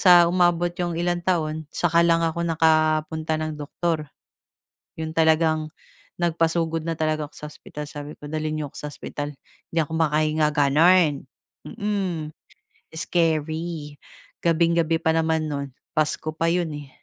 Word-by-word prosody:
sa 175 Hz, -3 st, +7 dB
umabot 175 Hz, -1 st, +3 dB
yung 175 Hz, -1 st, -1 dB
ilang 175 Hz, 0 st, 0 dB
taon, 155 Hz, -3 st, 0 dB
saka 170 Hz, -1 st, +3 dB
lang 165 Hz, 0 st, +4 dB
ako 165 Hz, +1 st, -1 dB
nakapunta 155 Hz, -1 st, +2 dB
ng 155 Hz, 0 st, -3 dB
doktor, 155 Hz, 0 st, -2 dB, 0.9 s
yon 160 Hz, 0 st, -3 dB
talagang 160 Hz, -1 st, +3 dB, 0.5 s
nagpasugod 165 Hz, -1 st, +1 dB
na 165 Hz, -1 st, -1 dB
talaga 155 Hz, -1 st, 0 dB
ako -, -, -32 dB
sa 150 Hz, -, -7 dB
ospital. 150 Hz, 0 st, -8 dB
Sabi 145 Hz, 0 st, -7 dB
ko, 145 Hz, -, -8 dB
dalhin 155 Hz, 0 st, -2 dB
n'yo 150 Hz, -, -3 dB
ako -, -, -24 dB
sa -, -, -5 dB
ospital, 145 Hz, 0 st, -5 dB, 0.4 s
'di 165 Hz, -, +2 dB
ako 155 Hz, -, -8 dB
makahinga, 155 Hz, -1 st, +2 dB
ganun, 150 Hz, +1 st, +4 dB, 0.4 s
mm, 190 Hz, -7 st, -2 dB, 0.7 s
scary. 160 Hz, -2 st, -1 dB, 0.5 s
Gabing-gabi 165 Hz, -1 st, +3 dB
pa 160 Hz, -, +3 dB
naman 160 Hz, -1 st, +1 dB
no'n 140 Hz, -1 st, -3 dB, 0.3 s
Pasko 155 Hz, 0 st, 0 dB
pa 165 Hz, +1 st, 0 dB
'yon 175 Hz, -2 st, 0 dB
eh, 145 Hz, -1 st, -9 dB
160 Hz, 140 wpm, -24 LUFS, 155-170 Hz, 0.9 s, sa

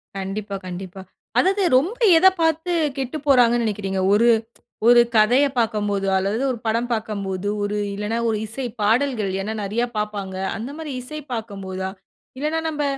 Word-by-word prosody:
கண்டிப்பா, 195 Hz, +1 st, -4 dB
கண்டிப்பா. 185 Hz, +1 st, -7 dB, 0.4 s
அதாவது 390 Hz, +2 st, +3 dB
ரொம்ப 370 Hz, -, -1 dB, 0.2 s
எத 375 Hz, -, +6 dB
பாத்து 325 Hz, +2 st, +1 dB, 0.3 s
கெட்டுப்போறாங்கன்னு 250 Hz, -4 st, +2 dB
நினைக்கிறீங்க. 195 Hz, -3 st, -2 dB
ஒரு 230 Hz, +3 st, +4 dB, 0.6 s
ஒரு 240 Hz, 0 st, +8 dB
கதைய 245 Hz, +7 st, +5 dB
பாக்கம்போது, 205 Hz, -3 st, 0 dB
அல்லது 200 Hz, +5 st, 0 dB
ஒரு 240 Hz, -, -4 dB
படம் 230 Hz, +2 st, 0 dB
பாக்கம்போது 205 Hz, -3 st, -2 dB, 0.4 s
இல்லன்னா, 210 Hz, +3 st, -2 dB
ஒரு 215 Hz, -, 0 dB
இசைப்பாடல்கள், 230 Hz, -1 st, 0 dB
ஏன்னா 215 Hz, +3 st, -3 dB
நெறைய 210 Hz, +4 st, -1 dB
பாப்பாங்க. 205 Hz, -3 st, -3 dB, 0.2 s
அந்த 240 Hz, +6 st, -6 dB
மாரி 315 Hz, -2 st, -6 dB
இசை 305 Hz, +5 st, -7 dB
பாக்கும்போதா? 195 Hz, -4 st, -5 dB, 0.5 s
இல்லன்னா 305 Hz, +3 st, 0 dB
நம்ப 300 Hz, -1 st, -2 dB
220 Hz, 130 wpm, -22 LUFS, 200-260 Hz, 0.6 s, ஒரு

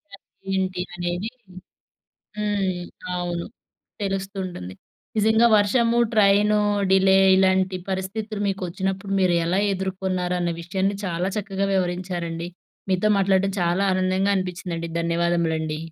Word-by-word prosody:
అంటే 195 Hz, -, -30 dB, 0.3 s
ఏంటి 180 Hz, -, -4 dB
అనేది. 175 Hz, +4 st, -3 dB, 1.1 s
హ్మ్. 200 Hz, -4 st, -1 dB, 0.4 s
అవును. 175 Hz, -1 st, -3 dB, 0.6 s
తెలుస్తూంటుంది. 190 Hz, -, -4 dB, 0.4 s
నిజంగా 220 Hz, +2 st, +4 dB
వర్షము 230 Hz, +3 st, +3 dB
ట్రైను 210 Hz, 0 st, +4 dB, 0.3 s
డిలే 190 Hz, 0 st, +5 dB, 0.2 s
ఇలాంటి 190 Hz, 0 st, +2 dB
పరిస్థితులు 205 Hz, +3 st, -3 dB
మీకు 195 Hz, -1 st, -3 dB
వచ్చినప్పుడు 195 Hz, +2 st, -3 dB
మీరు 180 Hz, -2 st, +3 dB
ఎలా 175 Hz, +3 st, +1 dB
ఎదుర్కొన్నారనే 185 Hz, -2 st, -1 dB
విషయాన్ని 190 Hz, +3 st, -1 dB
చాలా 180 Hz, 0 st, -1 dB
చక్కగా 195 Hz, -1 st, -2 dB
వివరించారండి. 175 Hz, -2 st, -2 dB, 0.4 s
మీతో 185 Hz, +3 st, +2 dB
మాట్లాడటం 195 Hz, 0 st, +2 dB
చాలా 175 Hz, +3 st, +1 dB
ఆనందంగా 185 Hz, +2 st, +1 dB
అనిపిచ్చిందండి. 175 Hz, -2 st, -4 dB
ధన్యవాదములండి. 170 Hz, -2 st, 0 dB
190 Hz, 100 wpm, -23 LUFS, 175-195 Hz, 1.1 s, డిలే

